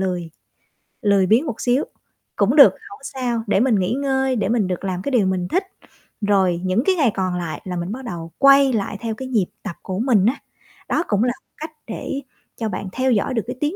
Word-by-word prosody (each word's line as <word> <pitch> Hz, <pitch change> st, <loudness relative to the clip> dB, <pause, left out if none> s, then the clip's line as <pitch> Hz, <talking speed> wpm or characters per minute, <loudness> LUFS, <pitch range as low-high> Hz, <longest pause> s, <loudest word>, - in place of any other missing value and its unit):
lười, 180 Hz, -3 st, -2 dB, 0.7 s
lười 200 Hz, -3 st, +3 dB
biếng 230 Hz, -, +3 dB
một 230 Hz, -, -5 dB
xíu 250 Hz, +3 st, +2 dB, 0.5 s
cũng -, -, +2 dB
được -, -, +9 dB, 0.2 s
hổng 405 Hz, -, -11 dB
sao 245 Hz, -4 st, -2 dB
để 200 Hz, -, +2 dB
mình 245 Hz, -1 st, +3 dB
nghỉ 185 Hz, +5 st, 0 dB
ngơi 265 Hz, -1 st, 0 dB
để 205 Hz, -4 st, -1 dB
mình 220 Hz, -5 st, +1 dB
được 180 Hz, 0 st, -3 dB
làm 185 Hz, -2 st, -2 dB
cái 280 Hz, -, -3 dB
điều 235 Hz, -6 st, +3 dB
mình 185 Hz, -1 st, -1 dB
thích, 370 Hz, -, 0 dB, 0.6 s
rồi 190 Hz, -4 st, +2 dB
những 185 Hz, +5 st, +1 dB
cái 380 Hz, -, +3 dB
ngày 280 Hz, -9 st, +3 dB
còn 185 Hz, -2 st, -1 dB
lại 175 Hz, -3 st, -4 dB
là 185 Hz, -1 st, -5 dB
mình 175 Hz, +2 st, -3 dB
bắt 260 Hz, +4 st, -6 dB
đầu 165 Hz, -6 st, -6 dB
quay 275 Hz, -1 st, +6 dB
lại 205 Hz, -1 st, -2 dB
theo 225 Hz, -2 st, -3 dB
cái 260 Hz, -, -6 dB
nhịp 220 Hz, -8 st, +1 dB, 0.2 s
tập 195 Hz, -6 st, -5 dB
của 185 Hz, 0 st, -4 dB
mình 225 Hz, -5 st, +3 dB
á. 240 Hz, +5 st, +3 dB, 0.5 s
Đó 330 Hz, -, +1 dB
cũng 205 Hz, +1 st, +1 dB
là 245 Hz, -, +2 dB
một -, -, -53 dB
cách 315 Hz, +1 st, -7 dB, 0.2 s
để 275 Hz, -, -4 dB, 0.4 s
cho 225 Hz, -2 st, -2 dB
bạn 200 Hz, -2 st, -4 dB
theo 260 Hz, +5 st, 0 dB
dõi 230 Hz, +3 st, +1 dB
được 230 Hz, -, +1 dB
cái 250 Hz, -, -4 dB
tiến 300 Hz, +5 st, -1 dB
220 Hz, 230 wpm, -21 LUFS, 190-260 Hz, 0.7 s, được